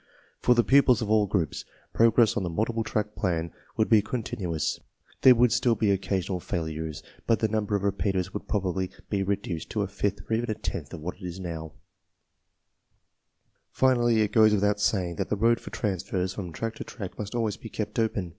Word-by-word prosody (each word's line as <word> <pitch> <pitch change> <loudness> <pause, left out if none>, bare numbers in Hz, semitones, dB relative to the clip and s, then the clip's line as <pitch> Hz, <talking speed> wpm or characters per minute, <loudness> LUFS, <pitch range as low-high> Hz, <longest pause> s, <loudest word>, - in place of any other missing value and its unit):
For 125 - +4
the 120 - +4
pupils 130 -4 +5
of 105 - -2
all 105 -1 +4
groups! 90 -7 -1 0.3
progress 115 -1 +4
on - - 0
the 90 - -2
multiple 110 +6 -1
track 105 -1 -2
plan 85 -5 -1 0.3
would 110 - +3
be 110 -2 +5
continuous. 100 - -3 0.4
There 130 -1 +8
woul 120 +1 +5
d 120 - +1
still 120 -1 +3
be 105 -3 +2
occasional 95 -1 -1
failures^ 80 -2 -4 0.2
but 115 - +4
the 110 - +1
num 110 0 -1
ber 105 - -1
of 100 - -1
repeaters 95 -2 0
woiflff - - -6
"probably 95 -2 -1 0.2
be 100 -2 +1
re 100 +1 +1
duced 90 -5 -6
to 105 - -1
a - - -2
fifth 100 0 -2
or - - -2
even 115 +1 0
a 110 - 0
tenth - - -5
of 80 - -9
what 90 +3 -5
it 90 0 -6
now 85 -3 -5
is. - - -17 2.0
Finally, 120 -4 +3
it 105 -1 +1
goes 110 -1 +6
without 105 0 +1
saying 90 -5 0
That - - -2
the - - +1
road 115 +3 +3
for - - -9
transfers 95 -3 -2
from 90 -4 -6
track 115 +8 -4
to - - -5
track 100 -6 -8
must 105 +2 -5
always 110 -3 -1
be 115 - -9
kept 105 +1 -3
open. 110 -5 0
105 Hz, 210 wpm, -27 LUFS, 90-110 Hz, 2.0 s, There